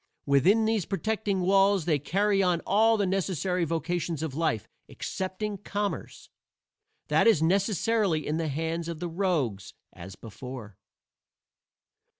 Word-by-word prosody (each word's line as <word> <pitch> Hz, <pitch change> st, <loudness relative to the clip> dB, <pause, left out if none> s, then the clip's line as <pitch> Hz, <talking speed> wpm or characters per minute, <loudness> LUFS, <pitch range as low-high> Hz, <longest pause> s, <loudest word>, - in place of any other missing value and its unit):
Within 180 Hz, +11 st, +4 dB
these 220 Hz, -5 st, 0 dB
protecting 205 Hz, -1 st, -1 dB
walls 195 Hz, -1 st, +3 dB
they 155 Hz, -4 st, +2 dB
carry 195 Hz, +7 st, +1 dB
on 180 Hz, -3 st, +2 dB
all 225 Hz, +2 st, +4 dB
the 205 Hz, -, +1 dB
necessary 185 Hz, -2 st, 0 dB
vocations 165 Hz, 0 st, -2 dB
of 155 Hz, -4 st, -3 dB
life 135 Hz, -9 st, -1 dB, 0.2 s
excepting 190 Hz, +2 st, -4 dB
commerce. 205 Hz, 0 st, -4 dB, 0.8 s
That -, -, +4 dB
is 180 Hz, -9 st, +4 dB
necessarily 195 Hz, -2 st, +1 dB
in 155 Hz, -, -1 dB
the 165 Hz, -1 st, -1 dB
hands 160 Hz, +3 st, -2 dB
of 165 Hz, -2 st, -5 dB
the 175 Hz, -, -3 dB
rogues, 165 Hz, -, -1 dB, 0.2 s
as 95 Hz, +2 st, -10 dB
before." 115 Hz, -2 st, -9 dB
180 Hz, 130 wpm, -27 LUFS, 155-200 Hz, 0.8 s, Within